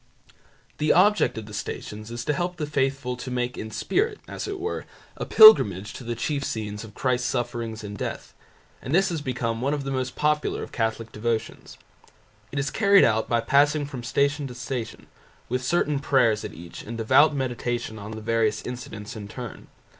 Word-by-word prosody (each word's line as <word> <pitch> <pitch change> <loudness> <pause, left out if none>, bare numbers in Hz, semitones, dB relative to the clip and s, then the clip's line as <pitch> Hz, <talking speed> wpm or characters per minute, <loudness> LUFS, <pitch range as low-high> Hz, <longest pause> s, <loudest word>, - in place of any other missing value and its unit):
The 150 - +3
object 205 - +4
of 110 - -5
the 105 - -11
Stations 105 +1 -6
is 120 0 -5
to 150 - +1
help 175 +4 -2
the 155 - -2
faithful 135 -3 -1
to 125 +1 -6
make 125 0 -2
in 110 - -6
spirit, 395 - 0
as - - -5
it 400 -1 -4
were, 435 +4 -3 0.3
a - - -5
pilgrimage 105 - +7
to - - -8
the 120 0 -3
chief 145 -2 -2
scenes 105 -4 -4
of 110 -2 -12
Christ's 125 -2 0
sufferings 120 -3 -3
and 105 0 -6
death, - - -5 0.5
and 135 - -1
this 190 +1 +4
has 165 -3 -3
become 120 -4 -2
one 140 +3 +1
of 145 - -4
the 135 - -3
most 130 -1 -2
popular 150 0 0
of - - -9
Catholic 110 0 -2
devotions. 110 +1 -3 0.7
It 145 - -5
is 140 0 -1
carried 200 -2 +5
out 110 -1 +2
by 120 -1 +2
passing 145 +3 +3
from 135 -3 -7
Station 140 +3 0
to 125 - -9
Station, 125 -3 -5 0.4
with 125 +1 -1
certain 150 0 +1
prayers 125 -6 +2
at - - -7
each 85 0 -9
and 115 +2 -7
devout 135 +7 +5
meditation 120 -3 -3
on 100 +1 -8
the 110 0 -7
various 110 -1 +1
incidents 115 -4 -7
in 105 -2 -7
turn. 120 +2 -8
125 Hz, 190 wpm, -25 LUFS, 110-145 Hz, 0.7 s, pilgrimage